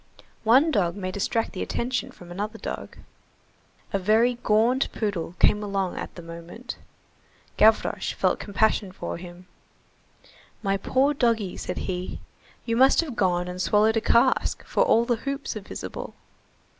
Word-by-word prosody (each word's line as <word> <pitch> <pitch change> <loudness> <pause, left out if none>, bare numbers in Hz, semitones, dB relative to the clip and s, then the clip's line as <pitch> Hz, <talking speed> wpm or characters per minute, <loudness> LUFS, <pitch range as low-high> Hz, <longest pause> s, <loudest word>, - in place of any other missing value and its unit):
One 265 +8 +5
dog 180 - +1
may 185 -2 -4
distract 225 +4 -1
the - - -5
attention 245 +1 -2
from 175 -1 -13
another 205 +4 -4
dog.45 - - -7 0.9
A 200 - +2
very 220 +6 +3
gaunt 230 +5 +2
poodle 190 -6 -3
came 210 - +4
along 195 -3 -2
at - - -6
the 175 - -9
moment. 170 +9 -8 0.8
Gavroche 220 0 +3
felt - - +1
compassion 205 -1 +1
for 185 - -5
him. 175 +1 -11 1.2
"My 195 -1 +1
poor 265 +8 +2
doggy," 230 -8 +1
said - - -5
he, 180 -1 -4 0.5
"you 230 - 0
must 265 +6 +5
have 295 -8 -6
gone 180 -3 +1
and 180 0 -4
swallowed 215 +3 +3
a 225 - +2
cask, 245 +4 +2
for - - 0
all 235 - +4
the 240 -1 +1
hoops 275 +1 -4
are 215 - -5
visible." 195 - -7
210 Hz, 150 wpm, -25 LUFS, 185-235 Hz, 1.2 s, One